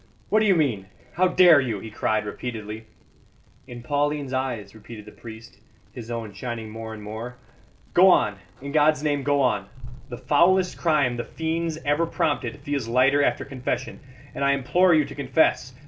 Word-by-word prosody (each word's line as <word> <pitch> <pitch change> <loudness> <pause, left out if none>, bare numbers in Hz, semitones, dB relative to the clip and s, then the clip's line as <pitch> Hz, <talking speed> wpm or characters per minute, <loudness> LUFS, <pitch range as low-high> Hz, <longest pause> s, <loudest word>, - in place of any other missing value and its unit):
"What 215 - +3
do 215 - +2
you 195 - +4
mean? 120 - 0 0.3
How 185 +1 +3
dare 180 -5 +6
you?" 115 -6 -3
he 110 +2 -9
cried 110 0 -1
repeatedly. 110 0 -6 0.8
"In 120 -1 -10
Pauline's 145 0 -1
eyes," 125 -7 -3
repeated 110 0 -12
the 105 - -12
priest, 110 -2 -12 0.3
his 120 -2 -9
own 115 -3 -5
shining 115 0 -6
more 110 0 -7
and 105 - -11
more. 110 +4 -7 0.6
"Go 185 +2 +7
on 105 - +2 0.2
in 140 - -5
God's 150 0 +3
name, 145 -2 0
go 140 +1 +1
on. 105 -7 0 0.4
The 120 - -7
foulest 180 +7 +2
crime 145 -7 +1
the 120 - -3
fiends 160 0 -3
ever 145 +4 +1
prompted 145 -7 -2
feels 140 -5 -3
lighter 130 +4 +3
after - - 0
confession; 130 -1 -4 0.3
and - - -4
I 140 0 +3
implore 175 +7 +2
you 155 -2 +3
to 140 - -9
confess. 140 -3 0
130 Hz, 175 wpm, -24 LUFS, 115-150 Hz, 0.8 s, Go